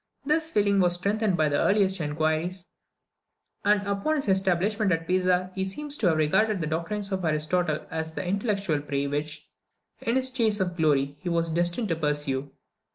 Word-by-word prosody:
This 315 Hz, +2 st, +1 dB
feeling 200 Hz, -6 st, +2 dB
was 175 Hz, -1 st, +4 dB
strengthened 200 Hz, +1 st, 0 dB
by 155 Hz, -, +3 dB
his -, -, -3 dB
earliest 195 Hz, -3 st, +2 dB
inquiries; 160 Hz, +4 st, -1 dB, 1.0 s
and 205 Hz, 0 st, +3 dB
upon 200 Hz, +10 st, 0 dB
his 280 Hz, -8 st, -2 dB
establishment 190 Hz, +2 st, +1 dB
at 165 Hz, -1 st, 0 dB
Pisa 185 Hz, 0 st, +1 dB
he 190 Hz, -, -2 dB
seems 290 Hz, +10 st, -4 dB
to 205 Hz, -, +1 dB
have 160 Hz, -2 st, +3 dB
regarded 200 Hz, +7 st, +2 dB
the 165 Hz, -, -2 dB
doctrines 170 Hz, +6 st, -3 dB
of 190 Hz, -1 st, -2 dB
Aristotle 155 Hz, +1 st, 0 dB
as 160 Hz, 0 st, -3 dB
the -, -, -3 dB
intellectual 195 Hz, -5 st, 0 dB
prey 140 Hz, -1 st, -2 dB
which, 150 Hz, +2 st, -4 dB, 0.5 s
in 230 Hz, -, 0 dB
his 260 Hz, 0 st, +1 dB
chace 225 Hz, -5 st, +1 dB
of 180 Hz, -2 st, -1 dB
glory, 145 Hz, -4 st, +1 dB
he 180 Hz, -, -4 dB
was 165 Hz, -1 st, 0 dB
destined 175 Hz, +6 st, 0 dB
to 165 Hz, -, +1 dB
pursue. 145 Hz, -3 st, -1 dB
180 Hz, 175 wpm, -26 LUFS, 155-205 Hz, 1.0 s, was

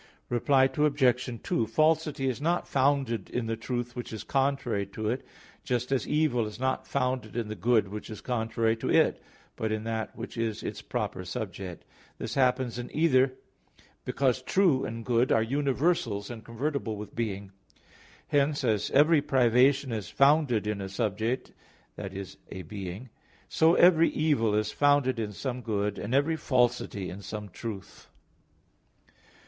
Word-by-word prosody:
Reply 130 Hz, +3 st, +3 dB
Obj. 135 Hz, -2 st, +2 dB, 0.2 s
2: 115 Hz, -, 0 dB
Falsity 155 Hz, +2 st, +1 dB
is 130 Hz, +1 st, -2 dB
not 170 Hz, +3 st, 0 dB
founded 135 Hz, -6 st, +1 dB
in 125 Hz, -2 st, -2 dB
the 115 Hz, 0 st, -1 dB
truth 120 Hz, +1 st, -4 dB
which 120 Hz, -, -6 dB
is 110 Hz, -2 st, -6 dB
contrary 135 Hz, -6 st, 0 dB
to 105 Hz, +2 st, -3 dB
it, 130 Hz, -, -3 dB, 0.4 s
just 125 Hz, +1 st, -2 dB
as 130 Hz, -5 st, 0 dB
evil 150 Hz, -7 st, +1 dB
is 105 Hz, -, -9 dB
not 130 Hz, 0 st, -1 dB
founded 125 Hz, -4 st, -1 dB
in 115 Hz, -3 st, -2 dB
the 110 Hz, -, -4 dB
good 115 Hz, -2 st, +2 dB
which 105 Hz, +3 st, -7 dB
is 110 Hz, -, -7 dB
contrary 115 Hz, -2 st, 0 dB
to -, -, -3 dB
it, -, -, +3 dB, 0.3 s
but 110 Hz, -1 st, -2 dB
in 110 Hz, 0 st, -2 dB
that 110 Hz, -3 st, -3 dB
which 120 Hz, +1 st, -7 dB
is 115 Hz, -2 st, -2 dB
its -, -, -5 dB
proper -, -, -3 dB
subject. 90 Hz, -4 st, -6 dB, 0.3 s
This -, -, -5 dB
happens 125 Hz, -2 st, +1 dB
in 120 Hz, -, -6 dB
either, 135 Hz, -5 st, +4 dB, 0.7 s
because 130 Hz, -2 st, 0 dB
true 165 Hz, -2 st, +2 dB
and 115 Hz, 0 st, -6 dB
good 120 Hz, +1 st, +2 dB
are 110 Hz, -, +4 dB
universals, 135 Hz, -, 0 dB
and 115 Hz, -2 st, -8 dB
convertible 120 Hz, -1 st, -3 dB
with 105 Hz, 0 st, -8 dB
being. 100 Hz, -4 st, -3 dB, 0.8 s
Hence, 145 Hz, 0 st, +2 dB
as 110 Hz, -4 st, +1 dB
every 150 Hz, +2 st, +5 dB
privation 130 Hz, +1 st, +3 dB
is 105 Hz, -5 st, -4 dB
founded 140 Hz, -6 st, +3 dB
in 105 Hz, -1 st, -2 dB
a 95 Hz, -, -5 dB
subject, 110 Hz, +4 st, -2 dB, 0.4 s
that 100 Hz, -2 st, -6 dB
is 95 Hz, 0 st, -8 dB
a 95 Hz, -, -7 dB
being, 100 Hz, +6 st, -7 dB, 0.4 s
so 165 Hz, +2 st, +4 dB
every 165 Hz, -2 st, +6 dB
evil 140 Hz, -9 st, +1 dB
is 105 Hz, 0 st, 0 dB
founded 145 Hz, -4 st, +3 dB
in 105 Hz, -2 st, -2 dB
some 125 Hz, +4 st, -4 dB
good, 105 Hz, -3 st, -2 dB
and 125 Hz, -, -2 dB
every 155 Hz, +4 st, +2 dB
falsity 125 Hz, -8 st, 0 dB
in 95 Hz, +3 st, -8 dB
some 105 Hz, +1 st, -6 dB
truth. 100 Hz, 0 st, -8 dB
120 Hz, 160 wpm, -28 LUFS, 110-135 Hz, 0.8 s, every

